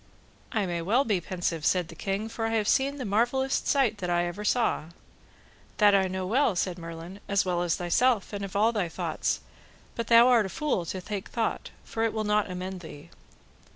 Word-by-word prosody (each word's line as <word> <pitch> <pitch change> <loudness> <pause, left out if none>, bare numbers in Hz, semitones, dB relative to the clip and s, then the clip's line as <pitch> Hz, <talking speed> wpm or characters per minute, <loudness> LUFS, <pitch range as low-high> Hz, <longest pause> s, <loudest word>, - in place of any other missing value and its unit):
I 215 -5 0
may 175 -2 -2
well 230 +11 +2
be 205 -5 +1
pensive, 170 -3 -3
said 180 +1 +1
the - - -10
king, 200 +2 -2
for 225 0 -3
I 225 - -1
have 215 -2 +1
seen 275 +4 +2
the 265 -3 -5
marvellest 245 +6 +1
sight 255 -7 +2
that 180 - -3
ever 175 +3 0
I - - -5
saw. 230 -7 +1 0.9
That 210 -1 +6 0.2
know 190 0 -3
I 185 - -4
well, 250 -4 +3
said 180 0 -1
Merlin, 165 +3 -8
as 200 -1 +2
well 175 -1 0
as 175 -2 +1
thyself, 210 +5 +1
and 200 -1 -4
of 195 0 -6
all 215 +3 +4
thy 200 -7 -1
thoughts, - - -2 0.5
but 235 - -4
thou 235 +1 +7
art 240 -4 +5
but 190 - -5
a - - -10
fool 290 - 0
to 185 - -4
take 205 -1 -5
thought, 230 -2 -2
for 225 - -5
it 225 - +1
will 220 - -1
not 210 -1 +1
amend 185 +1 -5
thee. 160 -4 -11
200 Hz, 215 wpm, -27 LUFS, 180-230 Hz, 0.9 s, thou